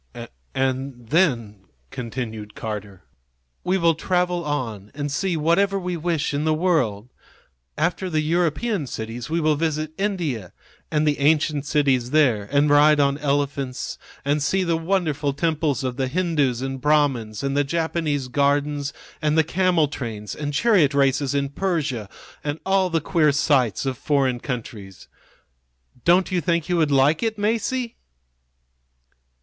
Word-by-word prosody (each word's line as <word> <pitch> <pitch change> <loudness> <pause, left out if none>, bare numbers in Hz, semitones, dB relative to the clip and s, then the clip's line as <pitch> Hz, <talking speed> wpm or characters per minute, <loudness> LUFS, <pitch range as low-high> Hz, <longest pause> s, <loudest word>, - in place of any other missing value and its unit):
"And 130 -2 -2
then," 115 - +1 0.3
continued 110 -3 -6
Carter, 100 -4 -6 0.6
"we 185 +1 +1
will 170 -2 +3
travel 180 +1 0
on 115 -10 -3
and 145 0 -3
see 180 +3 -1
whatever 195 +6 +2
we 180 -1 -3
wish 165 -3 -1
in 145 +1 -1
the 155 0 +2
world. 130 - 0 0.7
After 175 +4 0
the 155 -2 +1
European 170 - 0
cities 115 +3 -6
we 165 +2 0
will 155 -1 +2
visit 155 0 -1
India 165 - -2 0.4
and 150 0 +1
the 145 -1 +1
ancient 150 0 +2
cities 135 -5 +2
there, 125 -9 +2
and 145 +1 +3
ride 150 +1 +6
on 140 0 +2
elephants 140 -2 -2 0.3
and 145 +1 +1
see 190 +6 +1
the 170 -2 +1
wonderful 160 -5 0
temples 150 -2 0
of 130 -1 -3
the 135 -1 0
Hindoos 145 -6 0
and 135 -1 -4
Brahmins 140 -7 +1
and 140 0 -1
the 145 - +3
Japanese 160 -2 -1
gardens 145 +2 0 0.3
and 155 +1 +1
the 160 - +5
camel 175 -1 +2
trains 110 -7 -6
and 145 -1 -4
chariot 155 - +3
races 140 0 +2
in 140 -1 0
Persia, 140 - -2 0.3
and 150 +1 -3
all 190 -1 +2
the 165 -2 0
queer 155 -1 +2
sights 135 - +1
of 130 -3 -2
foreign 135 -4 +1
countries. 110 -7 -7 1.0
Don't 180 +2 +3
you 180 -1 +1
think 170 +1 0
you 175 - +2
would 155 -3 +2
like 140 +3 +3
it, 225 -1 -1
Masie?" 230 +3 -1
145 Hz, 145 wpm, -23 LUFS, 130-165 Hz, 1.0 s, ride